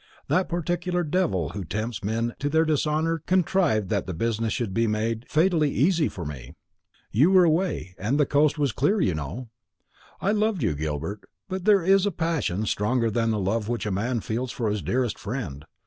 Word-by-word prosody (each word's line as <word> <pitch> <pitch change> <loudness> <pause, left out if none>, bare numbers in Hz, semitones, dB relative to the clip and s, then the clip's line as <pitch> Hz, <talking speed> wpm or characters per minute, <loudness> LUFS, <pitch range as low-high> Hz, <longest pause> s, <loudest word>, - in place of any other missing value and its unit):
That 185 0 +2
particular 175 +1 -1
devil 150 - 0
who 100 - -5
tempts 110 +6 -4
men 115 +3 -1
to 145 - -1
their 160 +2 +3
dishonour 155 +2 +1
contrived 175 - +2
that 100 -4 0
the 90 - -4
business 115 +3 -1
should 110 -4 -2
be 115 +3 +2
made 110 +2 -2
fatally 160 -1 +3
easy 160 +2 +2
for 90 - -7
me. 70 -5 -8 0.6
You 135 - +4
were 190 -1 +6
away, 165 - 0
and 115 +10 0
the 145 - +5
coast 150 +2 +2
was 145 -3 +1
clear, 150 - +1
you 95 - +2
know. 80 - -5 0.7
I 200 - +1
loved 210 - +1
you, 90 - +1
Gilbert; 80 +7 -4 0.2
but 190 -1 -4
there 205 -4 +5
is 195 +2 +4
a - - 0
passion 155 - -1
stronger 115 +3 0
than 115 +1 +1
the 110 - +1
love 105 +3 -1
which 120 -4 -2
a 105 - -1
man 115 +5 -1
feels 120 +4 -3
for 115 -4 -1
his 105 -1 -2
dearest 125 -3 -1
friend. 100 - -5
120 Hz, 195 wpm, -25 LUFS, 105-165 Hz, 0.7 s, were